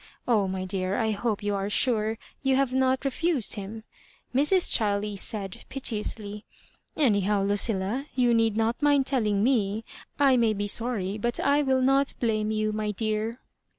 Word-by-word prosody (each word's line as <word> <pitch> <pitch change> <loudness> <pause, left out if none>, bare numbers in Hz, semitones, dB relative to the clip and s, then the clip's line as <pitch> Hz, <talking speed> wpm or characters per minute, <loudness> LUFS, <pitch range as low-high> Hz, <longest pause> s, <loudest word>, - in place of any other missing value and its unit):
Oh, 215 -5 +2
my 190 0 -3
dear, 185 0 -2
I 220 -2 0
hope 210 0 -2
you 205 0 -1
are 200 0 -2
sure 220 -1 +2 0.2
you 270 -1 +2
have 270 -1 +1
not 260 +1 +1
refused 280 -2 0
him," 215 +1 -7 0.5
Mrs. 300 +8 +3
Chiley 205 -1 0
said, 195 -1 -2
piteously; 210 -4 -3 0.3
" - - -35 0.2
anyhow, 205 -7 +2
Lucilla, 205 +5 0
you 245 -2 +3
need 225 -2 +2
not 225 +4 0
mind 285 -2 +3
telling 215 -7 +1
me. 220 -3 +1 0.3
I 275 -3 +5
may 230 -2 +2
be 205 0 -3
sorry, 210 -2 -1
but 235 +3 -1
I 285 +1 +2
will 265 -2 +1
not 270 +1 +2
blame 215 -3 0
you, 215 0 0
my 215 0 -2
dear." 215 +3 -2
220 Hz, 165 wpm, -26 LUFS, 205-260 Hz, 0.5 s, I